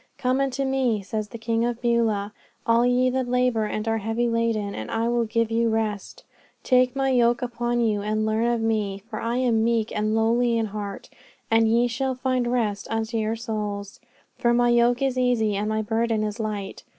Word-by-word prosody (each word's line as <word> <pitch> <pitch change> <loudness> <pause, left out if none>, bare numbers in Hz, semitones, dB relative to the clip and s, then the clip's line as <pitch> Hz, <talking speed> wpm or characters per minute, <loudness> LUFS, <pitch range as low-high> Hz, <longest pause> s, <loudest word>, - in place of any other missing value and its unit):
"Come 255 +1 +1
unto 275 0 -1
Me," 255 -6 0
says 215 +2 -3
the 230 - -8
King 225 0 -1
of 240 -1 -1
Beulah, 225 -4 0 0.3
"all 230 +1 +4
ye 250 +1 +2
that 260 -1 -1
labour 250 -3 +1
and 215 +1 -3
are 225 0 +1
heavy 225 +3 -1
laden, 230 -3 0
and - - -6
I 225 +1 0
will 235 -1 +1
give 230 0 0
you 230 0 +2
rest. 220 -3 -3 0.4
Take 255 0 +3
My 270 0 +1
yoke 240 -1 +3
upon 240 0 -1
you 215 -3 +1
and 215 +1 -1
learn 220 +2 +1
of 240 -1 0
Me, 210 -3 -1
for 215 - -4
I 235 +1 -1
am 235 -3 +2
meek 230 -1 0
and 215 +1 0
lowly 230 +1 +2
in 225 - +1
heart, 205 -1 -6 0.4
and 225 0 +4
ye 235 +2 +3
shall 260 +2 -2
find 255 -1 0
rest 215 -5 -1
unto 225 +1 -2
your 220 0 0
souls. 210 -3 -5 0.4
For 240 0 +3
My 240 0 +3
yoke 240 +2 +3
is 260 -2 0
easy 230 -4 +1
and 210 +2 -1
My 215 0 0
burden 225 0 0
is 210 +1 -4
light." 210 -3 -4
230 Hz, 200 wpm, -24 LUFS, 215-240 Hz, 0.4 s, all